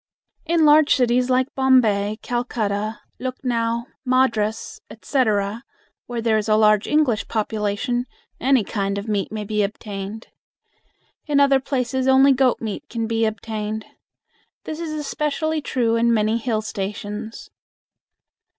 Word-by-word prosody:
In 330 Hz, -1 st, +3 dB
large 300 Hz, 0 st, +6 dB
cities 250 Hz, 0 st, +2 dB
like 255 Hz, +1 st, +1 dB
Bombay, 220 Hz, -6 st, +3 dB
Calcutta, 215 Hz, -3 st, -2 dB, 0.2 s
Lucknow, 235 Hz, -2 st, -2 dB, 0.2 s
Madras, 250 Hz, -5 st, 0 dB
etc., 215 Hz, -4 st, -1 dB, 0.4 s
where 240 Hz, -2 st, -4 dB
there 220 Hz, -2 st, +3 dB
is 215 Hz, +1 st, -4 dB
a 215 Hz, -, +5 dB
large 215 Hz, -1 st, +4 dB
English 295 Hz, -8 st, +1 dB
population, 220 Hz, +3 st, -1 dB, 0.3 s
any 260 Hz, -2 st, +3 dB
kind 200 Hz, -1 st, -2 dB
of 200 Hz, +2 st, -5 dB
meat 205 Hz, -3 st, -1 dB
may 215 Hz, -1 st, -4 dB
be 210 Hz, +1 st, -1 dB
obtained. 205 Hz, +1 st, -5 dB, 1.0 s
In 290 Hz, -2 st, +2 dB
other 275 Hz, -1 st, +5 dB
places 260 Hz, -1 st, -1 dB
only 265 Hz, +1 st, +6 dB
goat 260 Hz, -1 st, +2 dB
meat 220 Hz, -3 st, -5 dB
can 230 Hz, -1 st, -2 dB
be 225 Hz, 0 st, 0 dB
obtained. 220 Hz, 0 st, -4 dB, 0.8 s
This 310 Hz, 0 st, -6 dB
is 330 Hz, -2 st, -4 dB
especially 305 Hz, +1 st, -2 dB
true 235 Hz, -5 st, 0 dB
in 235 Hz, +1 st, +3 dB
many 220 Hz, 0 st, +2 dB
hill 225 Hz, -2 st, -1 dB
stations. 210 Hz, +2 st, -6 dB
230 Hz, 130 wpm, -22 LUFS, 215-260 Hz, 1.0 s, large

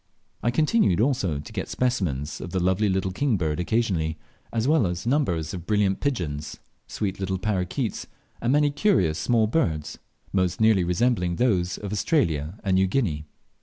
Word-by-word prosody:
I 120 Hz, -, +1 dB
continued 150 Hz, -, +2 dB
also 110 Hz, -, +1 dB
to 70 Hz, -, -9 dB
get -, -, -4 dB
specimens 80 Hz, -, -1 dB
of -, -, -6 dB
the 95 Hz, -, -1 dB
lovely 95 Hz, +4 st, +2 dB
little 95 Hz, 0 st, 0 dB
king 125 Hz, +2 st, +1 dB
bird 80 Hz, -3 st, -1 dB
occasionally, 90 Hz, -5 st, 0 dB, 0.3 s
as 115 Hz, +1 st, 0 dB
well 150 Hz, -, +3 dB
as 90 Hz, +3 st, -4 dB
numbers 95 Hz, -, 0 dB
of 90 Hz, -2 st, -7 dB
brilliant 105 Hz, -2 st, +2 dB
pigeons, 75 Hz, -, -3 dB, 0.3 s
sweet 100 Hz, -3 st, -3 dB
little 95 Hz, 0 st, -1 dB
parroquets, 100 Hz, +4 st, -2 dB, 0.3 s
and 120 Hz, -, +1 dB
many 145 Hz, +1 st, +3 dB
curious 140 Hz, -, +2 dB
small 115 Hz, -3 st, +2 dB
birds, 85 Hz, -, -1 dB, 0.3 s
most 90 Hz, -2 st, +1 dB
nearly 110 Hz, -4 st, +4 dB
resembling 90 Hz, 0 st, +1 dB
those 90 Hz, -6 st, +1 dB
of 100 Hz, 0 st, -5 dB
Australia 95 Hz, -, 0 dB
and 95 Hz, -, +1 dB
New 95 Hz, 0 st, +3 dB
Guinea. 90 Hz, -, -1 dB
95 Hz, 165 wpm, -25 LUFS, 85-120 Hz, 0.3 s, nearly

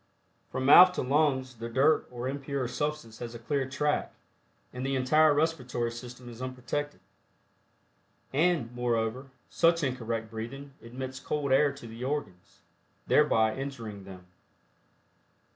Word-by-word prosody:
From 130 Hz, 0 st, -2 dB
mouth 180 Hz, +6 st, +9 dB
to -, -, -2 dB
lungs 130 Hz, -2 st, +1 dB
the 115 Hz, +1 st, -6 dB
dirt 140 Hz, +6 st, +3 dB
or 125 Hz, 0 st, -5 dB
impure 140 Hz, -1 st, -3 dB
substance 125 Hz, -3 st, -4 dB
has 120 Hz, -1 st, -6 dB
a -, -, -5 dB
clear 135 Hz, +3 st, -2 dB
track, 150 Hz, +2 st, 0 dB, 0.6 s
and 125 Hz, 0 st, -5 dB
the 135 Hz, 0 st, -1 dB
entire 155 Hz, +4 st, +4 dB
respiratory 130 Hz, -6 st, 0 dB
system 120 Hz, +1 st, -10 dB
is 120 Hz, 0 st, -10 dB
unprotected. 130 Hz, +3 st, -4 dB, 1.3 s
And, 150 Hz, -5 st, +2 dB
moreover, 120 Hz, +1 st, -1 dB, 0.2 s
such 165 Hz, 0 st, +2 dB
incorrect 115 Hz, -4 st, -3 dB
breathing 135 Hz, +5 st, -7 dB
admits 130 Hz, +3 st, -7 dB
cold 145 Hz, -2 st, -2 dB
air 140 Hz, +2 st, +4 dB
to 140 Hz, -3 st, -12 dB
the 115 Hz, +2 st, -8 dB
organs, 100 Hz, -10 st, -5 dB, 0.4 s
thereby 110 Hz, -7 st, +3 dB
injuring 115 Hz, -8 st, -6 dB
them. 95 Hz, -2 st, -11 dB
130 Hz, 130 wpm, -29 LUFS, 115-145 Hz, 1.3 s, mouth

